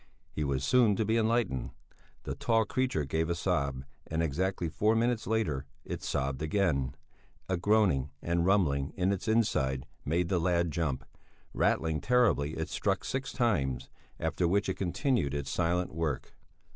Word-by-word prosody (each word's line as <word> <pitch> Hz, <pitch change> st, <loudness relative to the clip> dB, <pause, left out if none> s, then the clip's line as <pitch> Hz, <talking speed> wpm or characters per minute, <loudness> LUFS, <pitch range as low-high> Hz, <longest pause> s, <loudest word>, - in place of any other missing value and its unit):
He 75 Hz, -, -2 dB
was 70 Hz, -2 st, -1 dB
soon 120 Hz, -, +4 dB
to 110 Hz, -, 0 dB
be 110 Hz, +2 st, +1 dB
enlightened. 110 Hz, -, +1 dB, 0.5 s
The -, -, -3 dB
tall 115 Hz, -1 st, +2 dB
creature 125 Hz, -, 0 dB
gave 80 Hz, +4 st, -1 dB
a 85 Hz, -, +1 dB
sob, 70 Hz, -7 st, -1 dB, 0.2 s
and 80 Hz, +1 st, -1 dB
exactly 90 Hz, +4 st, -1 dB
four 105 Hz, +7 st, +2 dB
minutes 120 Hz, 0 st, +1 dB
later 80 Hz, -12 st, 0 dB, 0.2 s
it -, -, -5 dB
sobbed 65 Hz, 0 st, -2 dB
again; 80 Hz, -6 st, 0 dB, 0.5 s
a 95 Hz, -, +1 dB
groaning 90 Hz, -8 st, +2 dB
and 85 Hz, +2 st, 0 dB
rumbling 80 Hz, -8 st, +2 dB
in 95 Hz, +1 st, +2 dB
its 100 Hz, +1 st, -3 dB
inside 70 Hz, -, +1 dB, 0.2 s
made 85 Hz, +4 st, 0 dB
the 90 Hz, -1 st, +1 dB
lad 85 Hz, -1 st, +1 dB
jump; 70 Hz, -6 st, -2 dB, 0.5 s
rattling 80 Hz, -1 st, +1 dB
terribly 115 Hz, -, +2 dB
it 80 Hz, -, -3 dB
struck -, -, 0 dB
six 135 Hz, 0 st, -2 dB
times, 70 Hz, -, 0 dB, 0.3 s
after 80 Hz, +2 st, 0 dB
which 100 Hz, +3 st, +1 dB
it -, -, +1 dB
continued 95 Hz, -, 0 dB
its 70 Hz, -1 st, -3 dB
silent 90 Hz, 0 st, 0 dB
work. 80 Hz, -4 st, -2 dB
85 Hz, 160 wpm, -30 LUFS, 70-105 Hz, 0.5 s, soon